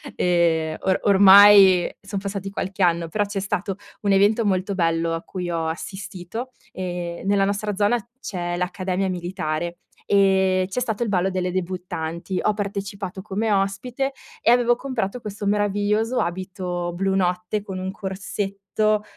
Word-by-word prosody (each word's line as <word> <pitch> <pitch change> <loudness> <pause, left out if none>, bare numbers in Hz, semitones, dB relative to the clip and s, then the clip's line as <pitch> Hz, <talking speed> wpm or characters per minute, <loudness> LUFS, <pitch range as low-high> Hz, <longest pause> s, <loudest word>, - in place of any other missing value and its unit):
ehm 165 -3 +2
o 190 - +2
ormai 195 -2 +8
son 195 0 -4
passati 200 0 -4
qualche 195 0 -3
anno, 170 -1 +2
però 205 +6 0
c'è 200 -1 -3
stato 195 0 -2 0.2
un 205 - +1
evento 205 +4 +4
molto 195 0 0
bello 165 -2 +1
a 165 - -3
cui 180 -2 -5
ho 165 -1 -1
assistito. 195 +7 -6 0.2
Ehm, 175 -1 -5
nella 200 0 +3
nostra 205 +1 -1
zona 205 +4 +2 0.2
c'è 175 -7 -4
l'Accademia 185 +1 -1
Militare, 175 -2 -3 0.3
ehm, 190 -2 +3
c'è 195 +6 -3
stato 230 -2 -2
il 235 - 0
ballo 190 -1 +1
delle 185 -1 -1
debuttanti. 180 -1 -4
Ho 215 - +2
partecipato 200 -1 -5
come 210 +2 -1
ospite 205 +8 -1 0.3
e 235 - +4
avevo 240 0 +4
comprato 250 -4 -3
questo 205 -1 -5
meraviglioso 205 +3 +1
abito 180 -1 -3
blu 190 +2 0
notte, 180 +2 0
con 190 -2 -6
un 185 - -3
corsetto 200 +2 -2
195 Hz, 145 wpm, -23 LUFS, 180-205 Hz, 0.3 s, ormai